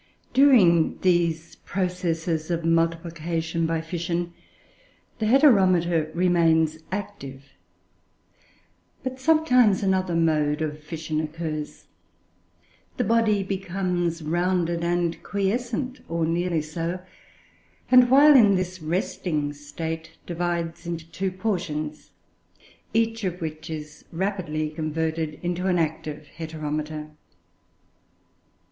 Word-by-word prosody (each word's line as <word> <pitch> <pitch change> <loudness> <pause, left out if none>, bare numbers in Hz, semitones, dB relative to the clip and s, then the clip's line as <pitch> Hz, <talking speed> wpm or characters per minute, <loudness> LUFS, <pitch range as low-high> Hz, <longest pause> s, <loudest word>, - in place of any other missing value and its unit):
During 220 - +5
these 170 -2 +1
processes 175 -3 -2
of 170 -1 -1
multiplication 165 0 0
by 165 -1 -1
fission, 170 +1 -3 0.9
the 215 - 0
Heteromita 185 - +4
remains 165 -3 +3
active; 145 -9 -6 1.5
but 260 0 -4
sometimes 255 - +4
another 190 -2 +1
mode 155 -2 +2
of 150 0 -4
fission 155 0 -3
occurs. 155 -1 -5 1.1
The - - +1
body 220 -3 +2
becomes 180 -3 -2
rounded 175 +1 0
and 175 -1 0
quiescent, 240 +5 -2
or 165 0 0
nearly 170 -1 0
so; 165 +3 -3 0.9
and, 250 -1 +7
while 285 +3 +7
in 210 -6 +7
this 185 -1 -3
resting 155 -2 -2
state, 160 +2 -6
divides 170 0 -3
into 165 -1 -5
two 190 0 -1
portions, 170 -6 -3 0.8
each 225 0 0
of 180 -2 -2
which 155 0 -6
is 150 -1 -7
rapidly 165 -4 -2
converted 160 0 -2
into 175 +1 -1
an 180 -1 +2
active 155 -2 -2
Heteromita. 155 -1 -4
170 Hz, 100 wpm, -25 LUFS, 160-190 Hz, 1.5 s, and